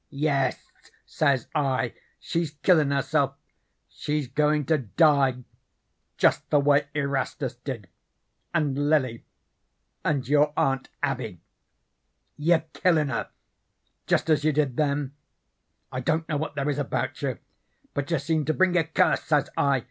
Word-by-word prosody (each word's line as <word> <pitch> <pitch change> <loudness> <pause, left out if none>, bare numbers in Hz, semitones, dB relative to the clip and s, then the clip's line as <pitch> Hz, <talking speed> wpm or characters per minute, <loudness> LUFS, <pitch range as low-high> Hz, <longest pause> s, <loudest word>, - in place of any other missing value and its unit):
"'Yes,' 140 -2 -1 0.3
says 140 -5 +1
I, 130 -5 0 0.3
'she's 165 -2 -2
killin' 160 -6 +5
herself. 140 -2 +1 0.5
She's 150 -2 -3
goin' 150 +2 +1
to 155 +1 +2
die 135 - +3 0.7
just - - +2
the 145 - +4
way 145 0 +3
Erastus 140 -2 -2
did, 120 -6 -6 0.6
and 145 -1 0
Lily, 130 -7 +1 0.8
and 140 -5 0
your 145 +1 +3
Aunt 135 0 +1
Abby. 125 - -2 1.0
You're 160 +2 +2
killin' 160 -5 +2
her 115 - -3 0.8
jest - - +2
as 150 -1 +3
you 155 - +3
did 145 -4 0
them. 140 -1 0 0.8
I 130 - -3
don't 160 +5 0
know 150 - -1
what 155 +1 -4
there 140 0 -1
is 145 -1 0
about 140 - -2
you, - - -2 0.6
but 145 +1 -3
you 165 - +2
seem 155 +2 0
to 155 - 0
bring 185 -1 +3
a 170 - +4
curse,' 160 0 +1
says 145 -2 +1
I. 140 -2 +2
145 Hz, 140 wpm, -26 LUFS, 135-155 Hz, 1.0 s, killin